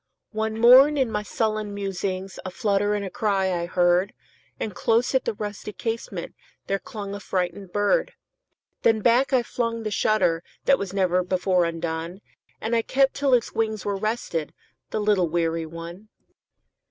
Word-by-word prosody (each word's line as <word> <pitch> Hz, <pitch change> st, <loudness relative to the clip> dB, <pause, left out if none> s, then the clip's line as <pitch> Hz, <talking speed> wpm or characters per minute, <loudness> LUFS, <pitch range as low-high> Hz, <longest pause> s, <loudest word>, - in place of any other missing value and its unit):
One 220 Hz, 0 st, -2 dB
morn, 260 Hz, +5 st, +8 dB
in 260 Hz, -4 st, +1 dB
my 210 Hz, -, -1 dB
sullen 215 Hz, -1 st, -2 dB
musings,A 190 Hz, -1 st, -4 dB
flutter 205 Hz, +2 st, +1 dB
and 200 Hz, -2 st, -4 dB
cry 200 Hz, -5 st, +1 dB
I 170 Hz, -1 st, -2 dB
heard; 175 Hz, +2 st, +2 dB, 0.5 s
And 210 Hz, -, -3 dB
close 240 Hz, +1 st, +1 dB
at 260 Hz, -, +2 dB
the -, -, -1 dB
rusty 210 Hz, 0 st, -6 dB
casementThere 225 Hz, -3 st, -5 dB
clung 200 Hz, -2 st, -6 dB
a 205 Hz, -, -5 dB
frightened 185 Hz, -1 st, -3 dB
bird. 205 Hz, -, +1 dB, 0.7 s
Then 225 Hz, -1 st, +3 dB
back 245 Hz, +5 st, +3 dB
I 255 Hz, -2 st, +3 dB
flung 230 Hz, -1 st, -2 dB
the 215 Hz, -, -3 dB
shutterThat 205 Hz, +5 st, +1 dB
was 200 Hz, -2 st, -4 dB
never 185 Hz, -2 st, +1 dB
before 180 Hz, -1 st, +1 dB
undone, 165 Hz, +2 st, -4 dB, 0.4 s
And 225 Hz, +2 st, -1 dB
I 230 Hz, -, +3 dB
kept 270 Hz, +3 st, +2 dB
till 280 Hz, -2 st, +3 dB
its 240 Hz, -, -1 dB
wings 220 Hz, -2 st, -1 dB
were 200 Hz, -1 st, 0 dB
restedThe 215 Hz, -8 st, -2 dB, 0.4 s
little 210 Hz, -4 st, +2 dB
weary 165 Hz, -1 st, -1 dB
one. 170 Hz, +6 st, -9 dB
205 Hz, 150 wpm, -24 LUFS, 180-225 Hz, 0.7 s, morn